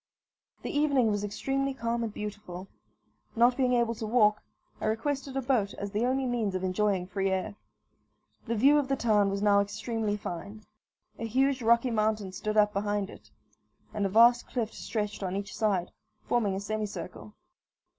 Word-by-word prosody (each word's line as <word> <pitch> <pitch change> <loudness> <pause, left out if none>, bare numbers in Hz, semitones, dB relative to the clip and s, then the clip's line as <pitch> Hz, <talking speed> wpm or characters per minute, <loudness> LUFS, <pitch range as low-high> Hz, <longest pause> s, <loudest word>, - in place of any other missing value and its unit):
The - - -4
evening 280 -6 +3
was 205 0 -1
extremely 270 +6 -2
calm 235 -1 -1
and 225 - -3
beautiful. 205 -3 -7 0.7
Not 240 +2 +5
being 255 -1 +2
able 235 -1 +2
to 220 -1 -5
walk, 210 -2 +3 0.4
I - - -4
requested 270 +5 -2
a 270 - -1
boat 240 -6 +1
as 200 0 -5
the 220 +4 0
only 265 +1 0
means 230 -6 -1
of 185 - -2
enjoying 190 0 +1
free 195 +1 -1
air. 190 +1 -1 0.9
The 230 - 0
view 280 +7 +5
of 280 - -1
the 270 - +1
town 210 -5 +2
was 200 +1 -2
now 205 -1 +5
extremely 210 +1 -2
fine. 200 +3 -7 0.6
A 230 - -3
huge 265 +3 +1
rocky 235 +2 +3
mountain 215 -3 0
stood 215 +3 -3
up 210 0 +4
behind 205 0 -1
it, - - -15 0.6
and 210 - -1
a 195 - +1
vast 235 +4 +5
cliff 230 -3 -3
stretched 210 -2 -4
on 185 -1 -2
each 200 0 -4
side, 195 -5 0 0.4
forming 210 -5 +1
a - - -2
semicircle. 210 0 -5
215 Hz, 175 wpm, -29 LUFS, 200-240 Hz, 0.9 s, Not